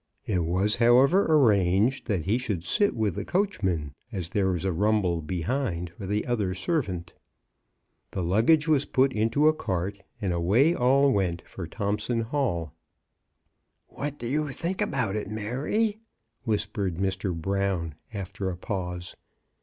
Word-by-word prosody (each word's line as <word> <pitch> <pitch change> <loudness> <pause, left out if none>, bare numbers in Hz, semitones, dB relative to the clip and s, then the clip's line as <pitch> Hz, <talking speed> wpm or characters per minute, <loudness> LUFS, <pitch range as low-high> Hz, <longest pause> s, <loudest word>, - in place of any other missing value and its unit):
It 90 -5 0
was, 95 +5 +1
however, 130 +11 +5
arranged 110 - +3
that 95 -9 -1
he 110 +6 +2
should 105 -9 -3
sit 200 - +2
with 110 -5 0
the - - -4
coachman, 95 - -1 0.2
as 90 -6 -4
there 100 0 +1
was 90 -1 -1
a 95 - +1
rumble 95 -2 +1
behind 90 - -2
for 95 +3 -8
the 105 +2 -1
other 105 -7 -1
servant. 95 - -2 1.0
The 95 - -3
luggage 115 - +3
was 150 -3 +3
put 130 0 +2
into 115 +8 +2
a 155 - +6
cart, 100 - -3 0.2
and 100 -5 -1
away 105 - +3
all 135 +1 +4
went 90 -5 0
for - - -7
Thomp 105 +1 -2
son 115 +1 -1
Hall. 110 - -1 1.2
"What 145 0 -5
do - - -7
you 150 +4 0
think 180 +8 -3
about 125 - 0
it, 105 -1 -3
Mary?" 140 - -1 0.5
whis 105 -3 +1
pered 100 -4 -3
Mr. 95 -2 -1
Brown, 95 -2 -1 0.2
after 100 -1 -4
a 90 - -5
pause. 90 -2 -4
105 Hz, 155 wpm, -27 LUFS, 90-130 Hz, 1.2 s, a